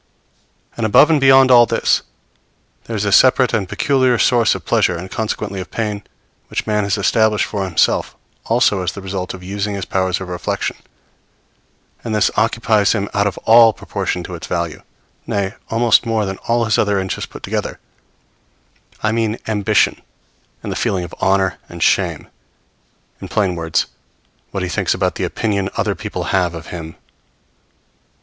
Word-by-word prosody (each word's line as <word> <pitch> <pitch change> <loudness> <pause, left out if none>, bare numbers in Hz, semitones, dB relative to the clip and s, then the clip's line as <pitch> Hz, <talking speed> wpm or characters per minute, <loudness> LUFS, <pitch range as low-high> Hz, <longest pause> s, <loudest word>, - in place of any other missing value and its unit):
And 115 - -3
above 110 +8 +5
and 150 -3 +3
beyond 135 -1 +6
all 120 -1 +7
this, - - +1 0.8
there 115 - -5
is 105 -1 -1
a 100 - 0
separate 130 +3 +5
and 100 -5 -1
peculiar 130 +3 +2
source 120 -1 +3
of - - -8
pleasure, 85 - +2
and 95 +3 -8
consequently 105 -3 -3
of 90 - -9
pain, 105 -3 -3 0.5
which - - -3
man 105 -1 0
has 100 +1 0
established 110 +1 +2
for 100 -2 -3
himself, 90 -4 +1 0.3
also 115 -4 +2
as 90 - -2
the 100 - -8
result 95 -1 -4
of 90 - -12
using 100 +2 -3
his 95 -3 -4
powers 95 0 -1
of 95 - -7
reflection; 90 -1 -3 1.3
and 110 -2 -2
this 105 - +2
occupies 110 -2 +2
him 100 -2 -2
out 100 0 +2
of 95 - -4
all 115 0 +7
proportion 90 - -4
to 90 - -8
its 85 - -7
value, 85 -2 -3 0.5
nay, 100 -1 -1 0.2
almost 115 0 +3
more 110 -2 0
than 95 0 -4
all 115 0 +2
his 110 -1 +1
other 105 -1 +2
interests 95 0 -4
put - - -11
together - - -3 1.3
I 110 - +2
mean 110 0 -1
ambition 105 0 +1 0.6
and - - -4
the - - -3
feeling 95 -2 -1
of 85 - -9
honor 95 -2 +1
and - - -4
shame; - - +1 0.9
in - - -6
plain 100 -4 0
words, 80 -2 -1 0.6
what 95 -2 -4
he 90 - -3
thinks - - 0
about - - 0
the - - -3
opinion 100 -4 -1
other - - 0
people - - -5
have 90 -3 +1
of 80 0 -9
him. 80 -2 -7
100 Hz, 170 wpm, -18 LUFS, 95-115 Hz, 1.3 s, all